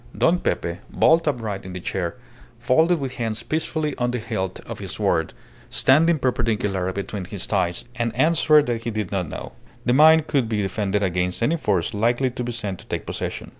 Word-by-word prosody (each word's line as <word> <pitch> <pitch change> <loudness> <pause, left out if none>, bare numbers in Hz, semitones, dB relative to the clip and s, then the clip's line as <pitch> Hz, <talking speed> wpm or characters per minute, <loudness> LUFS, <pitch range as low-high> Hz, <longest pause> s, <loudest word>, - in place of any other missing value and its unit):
Don 175 +2 +3
Pepe, 85 - -2
bolt 165 0 +3
upright 110 -8 -2
in 95 - -8
the 90 - -5
chair, 90 -1 -3 0.4
folded 160 +7 +3
his 135 -4 -4
hands 115 -1 -2
peacefully 155 -1 -2
on 120 0 +1
the 125 - -1
hilt 95 -4 -3
of - - -8
his - - -6
sword, - - 0 0.4
standing 160 +5 +4
perpendicular 105 -8 0
between 100 0 -5
his 95 +1 -3
thighs, 90 -4 -1
and 120 -2 -1
answered 155 -2 +4
that 120 -2 -2
he 115 - -3
did 105 -4 -3
not 90 -5 -2
know. - - -7 0.3
The 120 - +3
mine 160 +3 +7
could 140 -7 0
be 105 -2 0
defended 100 +1 -1
against 90 +2 -1
any 155 +8 +2
force 95 - 0
likely 120 +5 +1
to 125 - -4
be 120 - -3
sent 105 -6 -4
to - - -14
take - - -4
possession. - - -5
115 Hz, 195 wpm, -23 LUFS, 95-140 Hz, 0.4 s, mine